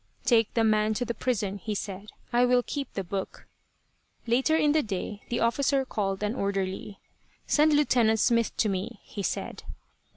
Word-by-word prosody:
"Take 230 Hz, -3 st, +3 dB
the 230 Hz, -, +3 dB
man 215 Hz, 0 st, +2 dB
to 245 Hz, -, -1 dB
the 235 Hz, -, -2 dB
prison," 205 Hz, -4 st, -2 dB
he 215 Hz, +1 st, -4 dB
said. 200 Hz, +1 st, -5 dB, 0.2 s
"I 240 Hz, +1 st, +4 dB
will 250 Hz, 0 st, +4 dB
keep 280 Hz, +1 st, -4 dB
the 195 Hz, -, -3 dB
book." 190 Hz, +2 st, -5 dB, 0.8 s
Later 260 Hz, +7 st, +2 dB
in 300 Hz, -2 st, +3 dB
the 310 Hz, +1 st, +3 dB
day 205 Hz, -2 st, -4 dB
the 240 Hz, -, -1 dB
officer 270 Hz, +3 st, +2 dB
called 195 Hz, -4 st, -2 dB
an 210 Hz, +1 st, 0 dB
orderly. 195 Hz, -2 st, -3 dB, 0.5 s
"Send 305 Hz, +1 st, +4 dB
Lieutenant 240 Hz, -6 st, +3 dB
Smith 230 Hz, 0 st, +2 dB
to 220 Hz, -, +2 dB
me," 195 Hz, 0 st, -3 dB
he 205 Hz, -, -7 dB
said. -, -, -3 dB
220 Hz, 170 wpm, -27 LUFS, 200-250 Hz, 0.8 s, I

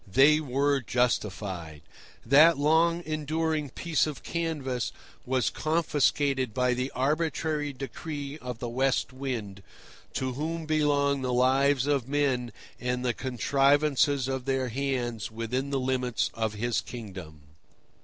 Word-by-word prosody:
They 140 Hz, +7 st, +6 dB
were 140 Hz, 0 st, +1 dB
justified. 95 Hz, -, -2 dB, 0.4 s
That 155 Hz, +3 st, +7 dB
long 165 Hz, +4 st, +3 dB
enduring 155 Hz, -1 st, -1 dB
piece 160 Hz, +4 st, 0 dB
of 150 Hz, -, -6 dB
canvas 150 Hz, -7 st, -2 dB, 0.4 s
was 130 Hz, -1 st, +1 dB
confiscated 145 Hz, -5 st, +1 dB
by 125 Hz, -1 st, +2 dB
the 125 Hz, +2 st, -2 dB
arbitrary 150 Hz, +1 st, 0 dB
decree 140 Hz, +2 st, -6 dB
of 125 Hz, -3 st, -6 dB
the 120 Hz, 0 st, -5 dB
West 130 Hz, +2 st, 0 dB
Wind, 120 Hz, -7 st, -5 dB, 0.5 s
to 130 Hz, -1 st, -1 dB
whom 160 Hz, +4 st, -3 dB
belong 145 Hz, -3 st, +2 dB
the 130 Hz, -1 st, -1 dB
lives 130 Hz, +2 st, +3 dB
of 140 Hz, -4 st, 0 dB
men 135 Hz, -4 st, 0 dB, 0.3 s
and 125 Hz, +1 st, -2 dB
the 120 Hz, -, +2 dB
contrivances 140 Hz, +2 st, +2 dB
of 130 Hz, -1 st, -3 dB
their 135 Hz, -2 st, 0 dB
hands 120 Hz, -4 st, -2 dB
within 115 Hz, +5 st, -3 dB
the 140 Hz, -1 st, 0 dB
limits 130 Hz, -2 st, 0 dB
of 110 Hz, -1 st, -2 dB
his 115 Hz, +2 st, -1 dB
kingdom. 95 Hz, -10 st, -9 dB
135 Hz, 125 wpm, -28 LUFS, 125-145 Hz, 0.5 s, That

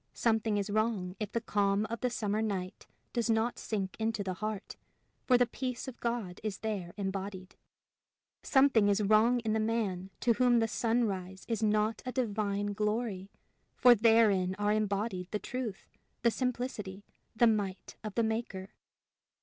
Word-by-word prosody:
Something 220 Hz, -2 st, +1 dB
is 205 Hz, 0 st, -2 dB
wrong 210 Hz, -4 st, 0 dB
if 215 Hz, -2 st, -3 dB
the 230 Hz, -, 0 dB
calm 205 Hz, -2 st, +1 dB
of 230 Hz, +1 st, -4 dB
the 250 Hz, -, +1 dB
summer 215 Hz, -2 st, -1 dB
night 195 Hz, -3 st, -3 dB, 0.3 s
does 235 Hz, -1 st, 0 dB
not 225 Hz, +2 st, +1 dB
sink 195 Hz, -4 st, -3 dB
into 220 Hz, -2 st, -1 dB
the 190 Hz, -1 st, -2 dB
heart, 215 Hz, +1 st, -5 dB, 0.5 s
for 250 Hz, -, +6 dB
the 245 Hz, -, +4 dB
peace 250 Hz, +1 st, -4 dB
of 260 Hz, -, -8 dB
God 235 Hz, -7 st, -3 dB
is 210 Hz, -3 st, -3 dB
there 200 Hz, -6 st, -3 dB
embodied. 195 Hz, -1 st, -4 dB, 0.9 s
Sometime 265 Hz, -7 st, +4 dB
is 205 Hz, +1 st, +2 dB
wrong 220 Hz, +4 st, +4 dB
in 220 Hz, -2 st, -1 dB
the 220 Hz, -, +1 dB
man 215 Hz, -5 st, -1 dB
to 235 Hz, -, +4 dB
whom 245 Hz, +1 st, +4 dB
the 225 Hz, -1 st, +3 dB
sunrise 205 Hz, -5 st, -1 dB
is 225 Hz, -2 st, -1 dB
not 215 Hz, +1 st, +1 dB
a 255 Hz, -, -4 dB
divine 205 Hz, -4 st, -1 dB
glory 210 Hz, -2 st, -2 dB, 0.5 s
for 250 Hz, -1 st, +7 dB
therein 215 Hz, -5 st, +4 dB
are 205 Hz, 0 st, +1 dB
embodied 200 Hz, -3 st, -1 dB
the 210 Hz, -, -1 dB
truth, 235 Hz, -3 st, -5 dB, 0.4 s
the 235 Hz, -, +5 dB
simplicity, 230 Hz, -6 st, -3 dB, 0.3 s
the 235 Hz, -, +5 dB
might 205 Hz, -4 st, 0 dB
of 215 Hz, -2 st, -6 dB
the 230 Hz, -, +2 dB
Maker. 220 Hz, -4 st, -3 dB
215 Hz, 160 wpm, -31 LUFS, 200-230 Hz, 0.9 s, for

